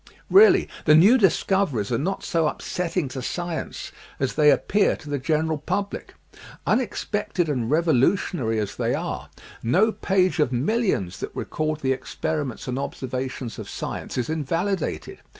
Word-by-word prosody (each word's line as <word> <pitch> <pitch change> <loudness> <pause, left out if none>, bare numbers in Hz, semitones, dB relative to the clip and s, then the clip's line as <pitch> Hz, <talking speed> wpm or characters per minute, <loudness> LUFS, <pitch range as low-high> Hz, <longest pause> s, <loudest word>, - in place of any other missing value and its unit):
Really, 420 +3 +7 0.2
the 150 - +7
new 195 +10 +7
discoveries 190 - +1
are - - +2
not 190 +7 -2
so 165 -2 +1
upsetting 175 0 -2
to 130 0 -5
science 175 +5 -4 0.3
as 135 -2 0
they 150 -1 +5
appear 205 +7 +3
to - - -14
the 145 - -1
general 155 +2 0
public. 200 +7 -4 0.5
Unex 245 -5 0
pected 205 -4 -1
and 125 -6 -1
revolutionary 155 - +2
as 105 -2 -3
they - - 0
are, - - -4 0.3
no 190 - +3
page 185 -4 +1
of 150 -4 +2
mil 145 - +1
lions 95 - -1
that - - -6
record 155 0 -2
the 130 -1 +2
experiments 145 -1 -4
and 125 +1 -2
observations 130 -3 -4
of - - -7
science - - -5
is 120 -2 -1
invalidated. 165 +5 -2
155 Hz, 150 wpm, -24 LUFS, 130-185 Hz, 0.5 s, Really